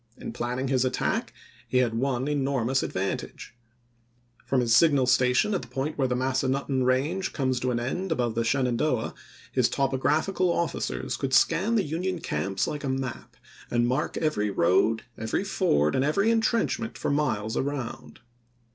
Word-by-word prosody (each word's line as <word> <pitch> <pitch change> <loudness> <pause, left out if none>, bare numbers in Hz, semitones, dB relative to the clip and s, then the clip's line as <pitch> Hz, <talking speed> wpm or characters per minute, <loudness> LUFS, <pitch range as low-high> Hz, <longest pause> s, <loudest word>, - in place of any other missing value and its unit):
In - - -7
planning 125 +2 -2
his 130 -1 +2
attack 130 -1 -1 0.4
he 130 - 0
had 125 -3 +2
one 130 +2 -1
enormous 135 -3 0
advantage; 95 +5 -4 0.9
from 135 - +2
his 115 -1 +3
signal 140 -2 +5
station 125 +9 +3
at 190 - 0
the - - -10
point 145 +3 -3
where 135 -2 +1
the 125 - -1
Massa 130 +1 0
nutten 135 0 0
range 140 +9 0
comes 130 -3 0
to 125 - -1
an 120 -1 0
end 175 +10 -3
above 120 -7 0
the 115 - 0
Shenan 125 0 +1
doah, 130 -6 0 0.4
his - - +2
topographical 155 +7 +1
officers 170 -2 -2
could 135 -1 0
scan 190 +8 +3
the 210 - +3
Union 180 +4 -2
camps 95 - -2
like 150 -1 -4
a 135 - -2
map, 130 -2 -4 0.3
and 120 0 +2
mark 130 +5 -1
every 105 -10 0
road, 100 +5 +2 0.2
every 110 0 -1
ford, 75 +1 +1
and 130 - +1
every 200 +10 +2
intrenchment 225 0 0
for - - -1
miles 110 -7 0
around. 135 -5 -4
130 Hz, 165 wpm, -26 LUFS, 120-150 Hz, 0.9 s, signal